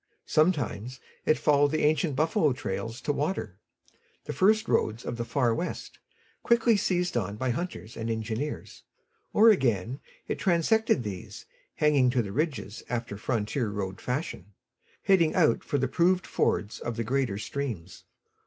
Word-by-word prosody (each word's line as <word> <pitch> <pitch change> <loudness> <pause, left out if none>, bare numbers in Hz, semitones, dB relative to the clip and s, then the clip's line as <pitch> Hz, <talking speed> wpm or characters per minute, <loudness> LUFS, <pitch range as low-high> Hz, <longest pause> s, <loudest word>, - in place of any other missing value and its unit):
Sometimes 130 - 0 0.3
it 155 - +4
followed 145 -1 +3
the 155 +1 0
ancient 150 -1 +2
buffalo 155 -1 +2
trails 115 0 -4
to 145 - 0
water 140 - -3 0.7
the - - -4
first 215 - +3
roads 110 +2 0
of - - -3
the 120 - -3
Far 120 -1 +1
West, 175 +10 -5 0.4
quickly 235 -1 +4
seized 180 -4 0
on 100 -3 -1
by 130 +3 -1
hunters 130 -5 -5
and 115 0 -4
engineers 115 +5 -4 0.5
or 225 +2 +7
again 120 - 0 0.3
it - - -3
transected 185 - +2
these, 100 -4 -7 0.3
hanging 145 -4 +3
to 125 -1 +1
the 100 - -6
ridges 120 -7 -2
after 115 -4 -3
frontier 110 +2 -1
road 95 -2 -4
fashion, 125 - -4 0.5
heading 170 -5 +3
out 165 -4 +3
for 145 - -1
the 135 0 +1
proved 180 +7 +2
fords 105 +1 0
of 120 - -4
the 115 - -2
greater 125 -3 0
streams. 110 -7 -5
130 Hz, 150 wpm, -28 LUFS, 110-155 Hz, 0.7 s, or